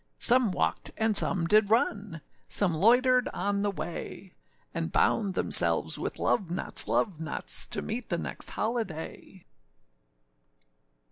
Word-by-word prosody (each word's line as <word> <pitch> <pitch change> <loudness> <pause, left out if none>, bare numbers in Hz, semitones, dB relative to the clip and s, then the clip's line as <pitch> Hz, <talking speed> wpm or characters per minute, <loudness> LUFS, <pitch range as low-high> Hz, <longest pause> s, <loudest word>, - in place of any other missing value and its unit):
Some 245 -4 +3
walked, 80 - -2
and 220 -1 0
some 180 -3 +3
did 210 +3 +2
run, 210 -6 -1 0.3
Some 185 -5 +1
loitered 250 - +2
on 200 +2 -2
the 205 - -1
way; 185 0 -8 0.4
And 165 0 -4
bound 195 -1 0
themselves - - +3
with - - -5
love 195 -7 -1
knots, 175 - +3
love 175 -7 -1
knots, 155 - +1
To - - -5
meet 230 +2 -6
the 170 - -1
next - - -7
holiday. 195 -5 -6
200 Hz, 130 wpm, -27 LUFS, 175-225 Hz, 0.4 s, Some